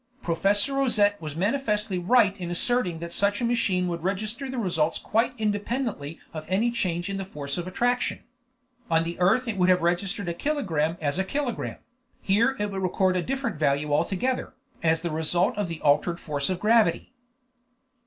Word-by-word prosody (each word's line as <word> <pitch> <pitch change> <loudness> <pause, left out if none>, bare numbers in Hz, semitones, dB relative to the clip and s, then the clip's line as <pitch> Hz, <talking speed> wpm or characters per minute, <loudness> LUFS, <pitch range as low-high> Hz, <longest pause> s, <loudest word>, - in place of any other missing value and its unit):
Professor 200 +9 +1
Rosette 215 -8 +2
was 155 -2 -6
manifestly 210 -1 0
right 200 +1 +4
in 175 -1 -4
asserting 180 0 +1
that 170 +1 -6
such 200 0 +1
a 240 - 0
machine 205 -7 +1
would 170 -2 -3
register 215 - -2
results 180 -11 0
quite 235 +3 0
independently 210 - -2
of 155 -1 -5
any 215 +6 +2
change 180 -6 -1
in 195 0 -3
the 195 - -3
force 145 -6 -5
of 175 0 -4
attraction. 245 +6 0 0.7
On 165 0 +3
the 170 +1 -5
earth 220 +8 +3
it 220 -3 -2
would 180 0 +3
have 180 -2 +4
registered 185 +3 0
a 170 - -1
kilogramme 170 - -1
as 150 +3 -1
a - - +2
kilogramme; 255 +4 -3 0.4
here 230 +7 +2
it 205 0 -1
recorded 185 -1 +1
a - - -12
different 260 - -2
value 145 0 +1
altogether, 195 - 0 0.3
as 160 0 +2
the 170 -1 -3
result 160 +4 +1
of 205 -2 -1
the 165 -2 -6
altered 150 +4 +2
force 145 -2 -2
of 185 -1 -1
gravity. 220 0 +2
190 Hz, 175 wpm, -26 LUFS, 170-225 Hz, 0.7 s, right